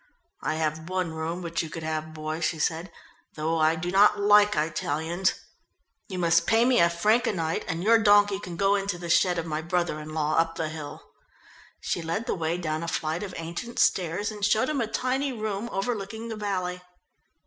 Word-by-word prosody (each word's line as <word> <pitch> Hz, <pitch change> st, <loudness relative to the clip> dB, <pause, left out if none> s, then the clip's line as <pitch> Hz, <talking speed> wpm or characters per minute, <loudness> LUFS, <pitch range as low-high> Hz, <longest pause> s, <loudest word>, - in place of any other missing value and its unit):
"I -, -, -1 dB
have 160 Hz, +1 st, -2 dB
one 185 Hz, -3 st, -1 dB
room 165 Hz, +3 st, -4 dB
which 170 Hz, -1 st, -2 dB
you 160 Hz, -, -6 dB
could 160 Hz, +1 st, -7 dB
have, 155 Hz, 0 st, -3 dB
boy," 155 Hz, 0 st, -4 dB
she 165 Hz, 0 st, -1 dB
said, 165 Hz, +3 st, -1 dB, 0.4 s
"though 160 Hz, +1 st, -1 dB
I 155 Hz, +1 st, +4 dB
do 175 Hz, +2 st, -3 dB
not 205 Hz, +2 st, +5 dB
like 205 Hz, 0 st, +5 dB
Italians. 160 Hz, +3 st, 0 dB, 0.7 s
You 190 Hz, -, -6 dB
must 170 Hz, -1 st, +3 dB
pay 225 Hz, +1 st, +4 dB
me 250 Hz, -1 st, +4 dB
a 170 Hz, -, +5 dB
franc 210 Hz, +8 st, +2 dB
a -, -, +2 dB
night, 165 Hz, -4 st, -2 dB
and 165 Hz, +1 st, -3 dB
your 225 Hz, +2 st, +5 dB
donkey 205 Hz, -2 st, +4 dB
can 180 Hz, -4 st, -7 dB
go 195 Hz, +3 st, +2 dB
into 200 Hz, -2 st, -1 dB
the 170 Hz, -1 st, -4 dB
shed 180 Hz, +1 st, +3 dB
of 165 Hz, -, -2 dB
my 155 Hz, -1 st, -3 dB
brother 170 Hz, -2 st, -1 dB
in 155 Hz, +1 st, -8 dB
law 155 Hz, 0 st, 0 dB
up 165 Hz, 0 st, +2 dB
the 160 Hz, -2 st, -2 dB
hill." 155 Hz, -2 st, -8 dB, 0.8 s
She -, -, -2 dB
led 165 Hz, +7 st, -3 dB
the -, -, -1 dB
way 165 Hz, -1 st, -1 dB
down 155 Hz, -2 st, -2 dB
a 170 Hz, -, -4 dB
flight 160 Hz, +1 st, -2 dB
of 195 Hz, -3 st, -6 dB
ancient 175 Hz, +9 st, -6 dB
stairs 185 Hz, +4 st, +1 dB
and 210 Hz, -1 st, -8 dB
showed 220 Hz, +6 st, +3 dB
him 290 Hz, -4 st, 0 dB
a 225 Hz, -, -1 dB
tiny 260 Hz, +4 st, -1 dB
room 215 Hz, -1 st, -3 dB
overlooking 220 Hz, +2 st, -3 dB
the 225 Hz, -, -4 dB
valley. 185 Hz, -4 st, -3 dB
175 Hz, 205 wpm, -26 LUFS, 160-205 Hz, 0.8 s, not